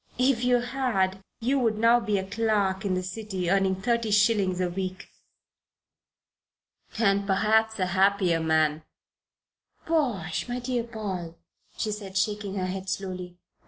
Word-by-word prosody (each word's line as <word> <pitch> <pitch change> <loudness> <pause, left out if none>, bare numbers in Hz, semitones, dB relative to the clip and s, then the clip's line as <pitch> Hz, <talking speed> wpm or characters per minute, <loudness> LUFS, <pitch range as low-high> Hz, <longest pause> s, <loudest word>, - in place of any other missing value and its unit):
"If 250 -1 +2
you 245 -1 +3
had, 235 -7 -1 0.2
you 265 +4 +1
would 225 -4 +1
now 230 +2 +5
be 215 -3 0
a 190 - -2
clerk 200 -2 0
in 195 -3 0
the 185 - -2
City 185 -2 -3
earning 195 -1 +2
thirty 230 +3 0
shillings 205 -3 +3
a 180 - +1
week." 185 +1 -4 1.9
"And 200 -2 +2
perhaps 220 +3 +2
a 185 - +1
happier 190 -2 +2
man." 160 -1 +2 1.0
"Bosh, 245 - -1
my 245 - -2
dear 245 -1 -2
Paul!" 190 -7 -5 0.4
she 215 - -1
said, 200 -2 -5
shaking 205 0 -1
her 185 -2 -1
head 190 +1 -4
slowly. 185 -2 -5
200 Hz, 140 wpm, -27 LUFS, 185-225 Hz, 1.9 s, now